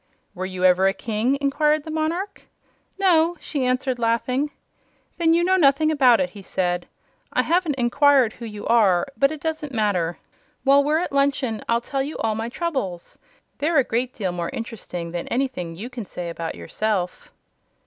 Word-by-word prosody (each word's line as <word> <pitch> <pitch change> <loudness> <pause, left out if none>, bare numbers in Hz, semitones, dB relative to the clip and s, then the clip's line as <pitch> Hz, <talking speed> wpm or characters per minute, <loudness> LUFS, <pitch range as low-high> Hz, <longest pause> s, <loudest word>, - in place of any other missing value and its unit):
"Were 185 -1 -4
you 185 -1 -2
ever 185 +1 +5
a 195 - +1
King?" 225 +6 0
inquired 300 +2 +2
the 315 - -7
monarch. 330 +6 -3 0.5
"No," 350 -3 +3
she 280 -4 -3
answered, 255 0 0
laughing. 235 +5 0 0.7
"Then 330 -1 +4
you 340 - +3
know 375 +1 +3
nothing 310 -1 +4
about 260 -6 +5
it," 275 - 0
he 205 - -11
said. 180 -2 -2 0.4
"I - - +2
haven't 335 -3 +1
inquired 260 -1 +3
who 235 - -9
you 210 -2 -7
are, 200 -7 +4
but 275 +1 +3
it 310 - -6
doesn't 310 -3 -4
matter. 185 -6 0 0.5
While 280 +1 +5
we're 300 +2 +2
at 345 - -2
luncheon, 275 -5 +1
I'll 235 0 +2
tell 270 +2 -2
you 285 +3 -4
all 220 - 0
my 225 +2 -3
troubles. 240 - -4 0.4
They're 310 +2 +1
a 275 - +6
great 245 +2 -1
deal 195 -7 -3
more 175 -1 -3
interesting 180 -7 -6
than 175 0 -4
anything 240 -10 -2
you 205 +8 -6
can 245 -4 -7
say 175 -2 -6
about 165 -1 -5
yourself." 180 - -3
250 Hz, 180 wpm, -23 LUFS, 200-295 Hz, 0.7 s, a